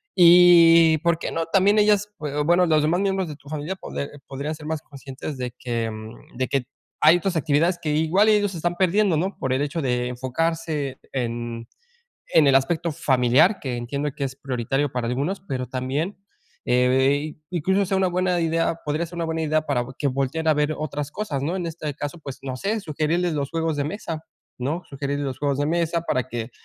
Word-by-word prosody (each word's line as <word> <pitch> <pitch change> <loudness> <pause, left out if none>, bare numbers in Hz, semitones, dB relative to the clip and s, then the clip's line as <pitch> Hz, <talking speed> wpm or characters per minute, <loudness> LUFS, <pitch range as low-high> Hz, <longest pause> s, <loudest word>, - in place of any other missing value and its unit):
Y 170 -2 +7
por 170 -1 +2
qué, - - -4
no 165 0 -1
también 195 +4 +3
ellas, 210 -1 +3 0.2
eh, 145 0 -1
bueno, 175 +2 +4
los 155 -2 +3
demás 170 +4 +1
miembros 195 -2 0
de 150 - -6
tu 145 -1 -16
familia, 155 +4 -4
pod - - -9 0.3
podrían 140 +3 -4
ser 155 -1 -12
más 160 -1 -2
conscientes 140 0 -8
de 125 -2 -4
que, 115 -2 -2
mm, 110 +2 -11
de 130 - 0
que 135 -3 0 0.4
hay 155 +3 +7
otras 180 0 -2
actividades 160 +4 +1
que 155 - -1
igual 160 +7 +3
ellos 205 -2 +3
se 175 - -6
están 175 +2 -1
perdiendo, 190 +1 +2
¿no? 190 +5 -2
por 130 - -1
el 130 - 0
hecho 150 +3 -3
de 125 -2 0
enfocarse 145 +2 -2
en 120 -2 -3 0.7
en 155 -3 +7
el 135 - +5
aspecto 160 +5 +1
familiar, 145 - +3
que 130 -3 -3
entiendo 140 +5 -3
que 140 - -3
es 135 0 -5
prioritario 135 +1 -2
para 125 -2 -2
algunos, 140 +11 -2
pero, 130 -3 -2
también, 130 - -3 0.5
eh, 130 +4 +2 0.2
incluso 190 +3 +1
sea 190 0 0
una 190 -1 +2
buena 180 0 +1
idea 165 0 0
podría 150 +3 -1
ser 175 - -11
una 170 - -1
buena 160 0 -2
idea 155 0 +1
para 120 -4 0 0.2
que 145 - +1
volte 135 +3 -1
a 155 - +5
ver 150 +1 0
otras 150 -1 -4
cosas, 160 -11 -3
¿no? 165 +6 -1
En 175 - -3
este 155 -2 -4
caso, 145 +3 -5
pues, 140 -3 -8
no 130 -1 -4
sé 215 - -1
sugerirles 165 +1 -1
los 140 -2 -2
juegos 165 -2 -1
de 145 - 0
mesa, 160 -3 -5 0.4
¿no? 155 +8 -2
Sugerirles 140 +1 -3
los 130 -2 -5
juegos 140 -2 0
de 145 - +1
mesa 170 0 0
para 130 -6 -1
que 120 -1 -5
155 Hz, 205 wpm, -23 LUFS, 135-170 Hz, 0.7 s, Y